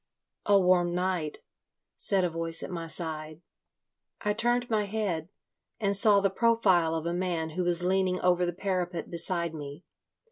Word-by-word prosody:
"A 200 -1 +6
warm 180 -2 +3
night," 180 -4 -2 0.5
said 195 -2 +2
a 180 - +1
voice 165 0 -3
at - - -6
my 165 -2 -5
side. 155 -1 -5 0.8
I 210 -1 0
turned 240 +3 +1
my 215 -3 0
head, 190 -6 -2 0.5
and 200 -2 0
saw 200 0 +5
the 195 -1 +1
profile 195 -7 +3
of 160 0 -3
a 170 - -1
man 175 -3 -2
who 180 +3 -2
was 175 0 +2
leaning 185 0 +1
over 180 0 +3
the 175 - 0
parapet 180 -2 -3
beside 170 -1 -1
me. 145 +1 -8
180 Hz, 165 wpm, -28 LUFS, 165-195 Hz, 0.8 s, A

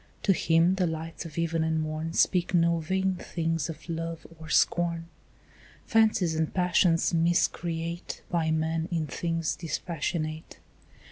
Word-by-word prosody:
To 195 - +4
him 165 +1 +3
the 180 -2 +2
lights 160 +1 -5
of 160 -1 -9
even 165 -1 0
and 160 0 0
morn 155 +1 -3
Speak 180 0 +2
no 170 0 +3
vain 190 +3 0
things 165 -1 -2
of 165 - -8
love 165 -1 -4
or 160 -1 -10
scorn, 170 +1 +2 0.8
Fancies 215 -7 +3
and 160 0 0
passions 180 -2 +2
miscreate 170 0 0
By 165 -2 +1
man 160 +1 0
in 165 -2 0
things 165 +1 -2
dispassionate. 160 -1 -4
165 Hz, 135 wpm, -28 LUFS, 160-175 Hz, 0.8 s, To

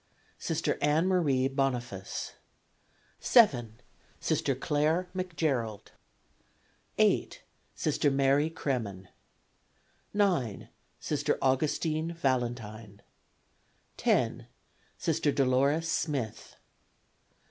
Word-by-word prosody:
Sister - - -1
Ann 150 +4 +3
Marie 145 -9 +2
Boniface. 125 -8 -3 0.9
7. 120 - +4 0.4
Sister 135 - 0
Clare 155 +6 +1
McGerald. 150 - -2 1.1
8. - - +2 0.3
Sister 145 - +1
Mary 140 +2 +3
Cremen. 110 - -3 1.0
9. 180 - 0 0.3
Sister 145 -1 -1
Augustine 155 +4 0
Valentine. 115 -7 -2 0.9
10. - - +1 0.5
Sister 160 -2 +1
Dolores 140 +4 +2
Smith. 140 -9 -2
135 Hz, 70 wpm, -29 LUFS, 120-160 Hz, 1.1 s, 7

